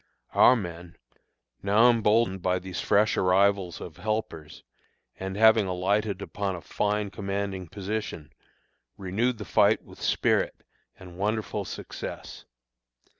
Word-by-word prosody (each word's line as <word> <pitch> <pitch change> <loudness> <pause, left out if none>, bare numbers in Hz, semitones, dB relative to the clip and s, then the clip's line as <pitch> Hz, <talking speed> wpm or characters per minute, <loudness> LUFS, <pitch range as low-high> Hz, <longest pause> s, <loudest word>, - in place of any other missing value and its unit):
Our 130 - +7
men, 85 -5 -7 0.7
now 105 +4 +4
emboldened 110 -3 +2
by 90 +1 +1
these 90 0 -5
fresh 105 +1 +3
arrivals 95 -1 +2
of - - -9
helpers, 85 -7 -4 0.6
and 95 0 -4
having 110 -1 +5
alighted 100 +2 -1
upon 100 -2 -3
a 85 - -8
fine 105 +1 -1
commanding 100 -1 -4
position, 100 -4 -5 0.6
renewed 110 +6 -1
the 105 - -7
fight - - +3
with - - -15
spirit - - 0 0.3
and 90 -1 -12
wonderful 105 +2 -2
success. - - -8
100 Hz, 120 wpm, -27 LUFS, 90-105 Hz, 0.7 s, Our